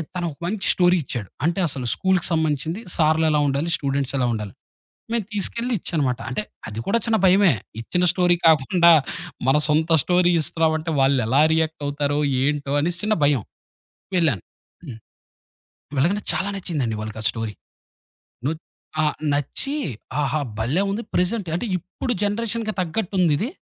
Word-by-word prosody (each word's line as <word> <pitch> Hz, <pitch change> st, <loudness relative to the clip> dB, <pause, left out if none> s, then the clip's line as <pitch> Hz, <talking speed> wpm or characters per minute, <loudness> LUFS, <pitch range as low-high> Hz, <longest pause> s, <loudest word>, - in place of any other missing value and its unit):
తను 175 Hz, -1 st, -2 dB
ఒక 140 Hz, -, -14 dB
మంచి 195 Hz, +2 st, -2 dB
స్టోరీ 180 Hz, 0 st, +4 dB
ఇచ్చాడు. 120 Hz, -7 st, -5 dB, 0.2 s
అంటే, 175 Hz, +3 st, +1 dB
అసలు 130 Hz, -4 st, -4 dB
స్కూలుకి 190 Hz, -2 st, +1 dB
సంబంధించింది 160 Hz, +3 st, -1 dB
సార్లెలా 155 Hz, -1 st, +3 dB
ఉండాలి? 140 Hz, +5 st, 0 dB
స్టూడెంట్స్ 140 Hz, -1 st, -1 dB
ఎలా 130 Hz, -, +1 dB
ఉండాలి? 105 Hz, -3 st, -5 dB, 0.6 s
మే 235 Hz, -, +2 dB
తీసుకెళ్ళి 235 Hz, +4 st, -2 dB
ఇచ్చాన్నమాట. 140 Hz, -8 st, -1 dB
అంటే 130 Hz, -, -2 dB, 0.3 s
అది 110 Hz, 0 st, -5 dB
కూడా 230 Hz, +4 st, +3 dB
చిన్న 225 Hz, -1 st, +3 dB
భయమే. 190 Hz, -1 st, +6 dB, 0.3 s
ఇచ్చిన 180 Hz, +10 st, 0 dB
స్టోరీ 175 Hz, -1 st, +3 dB
కాకుండా, 165 Hz, +3 st, +5 dB, 0.6 s
మన 135 Hz, -, +5 dB
సొంత 160 Hz, +2 st, +2 dB
స్టోరీ 180 Hz, +2 st, +3 dB
ఇస్తున్నామంటే 160 Hz, +1 st, 0 dB
వాళ్లెలా 135 Hz, -1 st, +3 dB
రియాక్ట్ 160 Hz, -1 st, 0 dB
అవుతారో, 145 Hz, 0 st, -1 dB, 0.2 s
ఏంటో, 145 Hz, 0 st, 0 dB
అనేసి 170 Hz, +3 st, -1 dB
చిన్న 215 Hz, 0 st, +2 dB
భయం. 140 Hz, -6 st, +3 dB, 0.7 s
వెళ్ళాను, 155 Hz, -, +2 dB, 0.4 s
హ్మ్. 120 Hz, -7 st, -8 dB, 1.0 s
వెళ్లగానే 195 Hz, +9 st, +1 dB
చాలా 195 Hz, +2 st, -1 dB
నచ్చిందండి 140 Hz, -, -2 dB
వాళ్ళకా 110 Hz, 0 st, -6 dB
స్టోరీ. 115 Hz, -2 st, -4 dB, 0.9 s
ను 150 Hz, -, +1 dB, 0.5 s
ఆ! -, -, +3 dB, 0.3 s
నచ్చి, 145 Hz, -, -2 dB, 0.5 s
"ఆహా! 145 Hz, +2 st, 0 dB, 0.2 s
భలే 150 Hz, -, +1 dB
ఉంది. 225 Hz, +4 st, -3 dB
ప్రెజెంట్ 180 Hz, 0 st, 0 dB
అంటే 210 Hz, -, -3 dB
ఇప్పుడు 190 Hz, +8 st, -4 dB
జనరేషన్‌కి 220 Hz, +1 st, -1 dB
తగ్గట్టుందిది. 185 Hz, -, 0 dB
160 Hz, 135 wpm, -22 LUFS, 140-185 Hz, 1.0 s, భయమే